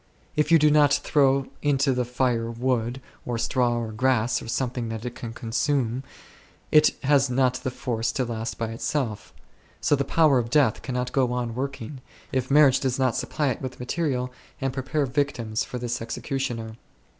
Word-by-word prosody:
If 150 Hz, +2 st, +1 dB
you 165 Hz, -, +8 dB
do 150 Hz, -1 st, +4 dB
not 145 Hz, -1 st, +5 dB
throw 140 Hz, -2 st, +3 dB, 0.2 s
into 140 Hz, -2 st, +2 dB
the 125 Hz, -1 st, 0 dB
fire 120 Hz, -2 st, 0 dB
wood, 120 Hz, +1 st, -1 dB, 0.2 s
or 120 Hz, -1 st, -3 dB
straw, 120 Hz, 0 st, +1 dB
or 115 Hz, -2 st, -3 dB
grass, 120 Hz, 0 st, +1 dB
or -, -, -9 dB
something 120 Hz, 0 st, -2 dB
that 110 Hz, +1 st, -5 dB
it 120 Hz, -, -4 dB
can 120 Hz, -2 st, -7 dB
consume, 125 Hz, +1 st, -1 dB, 0.7 s
it 155 Hz, 0 st, +5 dB
has 140 Hz, -1 st, +3 dB
not 125 Hz, 0 st, +2 dB
the 130 Hz, -, -2 dB
force 115 Hz, -3 st, -2 dB
to 130 Hz, -, 0 dB
last 115 Hz, -1 st, -4 dB
by 115 Hz, -1 st, -2 dB
itself; 115 Hz, -1 st, -3 dB, 0.5 s
so -, -, +3 dB
the 140 Hz, -, 0 dB
power 150 Hz, -3 st, +4 dB
of 115 Hz, -1 st, -3 dB
death 135 Hz, -4 st, +3 dB
cannot 125 Hz, -1 st, -3 dB
go 130 Hz, -3 st, +2 dB
on 120 Hz, -2 st, -2 dB
working, 130 Hz, 0 st, -5 dB, 0.3 s
if 130 Hz, -1 st, -1 dB
marriage 140 Hz, -2 st, +6 dB
does 130 Hz, -2 st, -1 dB
not 130 Hz, -3 st, +1 dB
supply 150 Hz, -3 st, -1 dB
it 125 Hz, -, -3 dB
with 130 Hz, -1 st, -6 dB
material 125 Hz, -2 st, -2 dB, 0.3 s
and 135 Hz, -1 st, -1 dB
pre 135 Hz, -, -3 dB
pare 145 Hz, +2 st, 0 dB
victims 125 Hz, -5 st, -1 dB
for 125 Hz, -, -6 dB
this 120 Hz, 0 st, -3 dB
executioner. 115 Hz, -2 st, -4 dB
125 Hz, 180 wpm, -25 LUFS, 115-135 Hz, 0.7 s, you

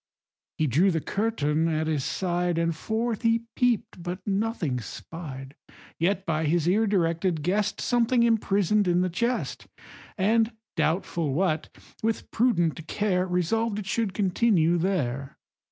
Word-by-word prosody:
He 155 Hz, -, +1 dB
drew 155 Hz, +9 st, +3 dB
the 165 Hz, -3 st, +1 dB
curtain 165 Hz, -6 st, 0 dB
at 160 Hz, -1 st, 0 dB
his 155 Hz, -4 st, -1 dB
side, 175 Hz, 0 st, -1 dB
And 165 Hz, -1 st, +1 dB
forth 220 Hz, +5 st, -2 dB
he 230 Hz, -1 st, +2 dB
peep'd, 240 Hz, -7 st, 0 dB
but 175 Hz, +1 st, -4 dB
nothing 200 Hz, -, -1 dB
spied. 135 Hz, +1 st, -8 dB, 0.4 s
Yet, 190 Hz, +3 st, +1 dB
by 160 Hz, -1 st, 0 dB
his 165 Hz, +1 st, +1 dB
ear 215 Hz, +5 st, +3 dB
directed, 170 Hz, -4 st, +1 dB
guess'd 200 Hz, +5 st, 0 dB
Something 240 Hz, 0 st, +2 dB
imprison'd 210 Hz, -3 st, +2 dB
in 175 Hz, 0 st, +3 dB
the 185 Hz, -1 st, 0 dB
chest, 235 Hz, +8 st, -2 dB, 0.5 s
And, 220 Hz, +4 st, +2 dB, 0.2 s
doubtful 160 Hz, -4 st, 0 dB
what, 160 Hz, -3 st, 0 dB, 0.3 s
with 225 Hz, 0 st, -2 dB
prudent 175 Hz, -, +1 dB
care 185 Hz, -2 st, 0 dB
Resolved 200 Hz, +5 st, 0 dB
it 210 Hz, -, -4 dB
should 210 Hz, 0 st, -1 dB
continue 185 Hz, -4 st, +2 dB
there. 140 Hz, -8 st, -2 dB
180 Hz, 135 wpm, -26 LUFS, 160-215 Hz, 0.5 s, drew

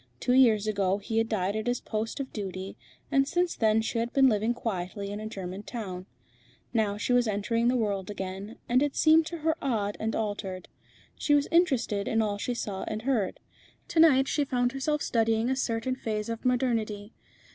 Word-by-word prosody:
Two 250 Hz, -, +1 dB
years 230 Hz, -5 st, +5 dB
ago 200 Hz, -3 st, +1 dB
he 220 Hz, +2 st, -1 dB
had 225 Hz, 0 st, 0 dB
died 200 Hz, -2 st, 0 dB
at 220 Hz, +2 st, -3 dB
his 245 Hz, 0 st, +1 dB
post 220 Hz, +4 st, -4 dB
of 270 Hz, -1 st, -5 dB
duty, 190 Hz, -2 st, -5 dB, 0.4 s
and 275 Hz, 0 st, +3 dB
since 350 Hz, +3 st, 0 dB
then 220 Hz, 0 st, +2 dB
she 230 Hz, +1 st, -1 dB
had 235 Hz, +1 st, -2 dB
been 270 Hz, -1 st, +6 dB
living 220 Hz, -1 st, +2 dB
quietly 200 Hz, -3 st, -4 dB
in 205 Hz, -, -4 dB
a 215 Hz, -, -5 dB
German 190 Hz, -2 st, -6 dB
town. 195 Hz, -5 st, -6 dB, 0.7 s
Now 210 Hz, -3 st, +1 dB
she 230 Hz, +4 st, 0 dB
was 245 Hz, -1 st, +3 dB
entering 225 Hz, +3 st, 0 dB
the 250 Hz, -, +3 dB
world 205 Hz, -5 st, -1 dB
again, 195 Hz, +2 st, -6 dB
and 250 Hz, +2 st, +3 dB
it 290 Hz, -1 st, 0 dB
seemed 315 Hz, 0 st, +5 dB
to 340 Hz, -, -5 dB
her 320 Hz, 0 st, +1 dB
odd 210 Hz, -6 st, -1 dB
and 220 Hz, +1 st, -1 dB
altered. 205 Hz, -4 st, -4 dB, 0.5 s
She 290 Hz, -, +3 dB
was 290 Hz, 0 st, +2 dB
interested 260 Hz, -, +2 dB
in 225 Hz, -, +1 dB
all 205 Hz, -2 st, 0 dB
she 245 Hz, +3 st, -2 dB
saw 200 Hz, -4 st, -4 dB
and 215 Hz, 0 st, -4 dB
heard. 235 Hz, -7 st, 0 dB, 0.5 s
To 330 Hz, -, 0 dB
night 270 Hz, -5 st, +6 dB
she 295 Hz, -, +1 dB
found 245 Hz, -2 st, 0 dB
herself 290 Hz, +3 st, -1 dB
studying 225 Hz, +1 st, +1 dB
a -, -, +1 dB
certain 255 Hz, -1 st, -1 dB
phase 215 Hz, -4 st, -3 dB
of 230 Hz, +1 st, -5 dB
modernity. 230 Hz, -4 st, 0 dB
225 Hz, 200 wpm, -28 LUFS, 205-255 Hz, 0.7 s, been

